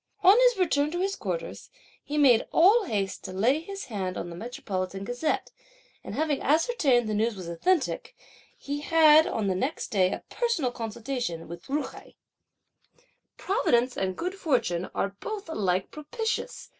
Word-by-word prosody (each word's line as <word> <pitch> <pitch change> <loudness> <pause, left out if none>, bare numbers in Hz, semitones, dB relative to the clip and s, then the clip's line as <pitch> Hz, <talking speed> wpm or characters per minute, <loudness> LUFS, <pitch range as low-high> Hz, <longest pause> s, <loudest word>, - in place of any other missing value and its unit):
On 380 +3 +8
his - - +5
return 300 -5 +2
to 350 +3 -3
his 390 +1 0
quarters, - - -5 0.3
he 295 - -4
made 255 -6 +5
all 405 +6 +5
haste 200 - -2
to - - -5
lay 230 +10 +2
his 395 +4 -7
hand 190 -5 -4
on 175 - -5
the - - -7
Metropolitan 195 -3 -4
Gazette, 245 +8 -2 0.5
and - - -7
having 295 0 0
ascertained 295 - +2
that - - -2
the - - -1
news 220 +2 0
was 185 -3 -8
authentic, 275 - -1 0.4
he 285 +1 -4
had 315 0 +6
on 220 - -2
the 190 - +1
next 260 - -2
day 190 -5 +2
a - - -5
personal 420 - -1
consultation 230 -6 -4
with 170 +1 -10
Ju 290 +2 0
hai. - - -11 1.2
"Providence 255 - +1
and 185 -1 -2
good 360 +2 -3
fortune 235 - -1
are 200 0 -1
both 430 -3 -6
alike 190 - -1
propitious!" 445 +11 -4
265 Hz, 165 wpm, -27 LUFS, 200-330 Hz, 1.2 s, On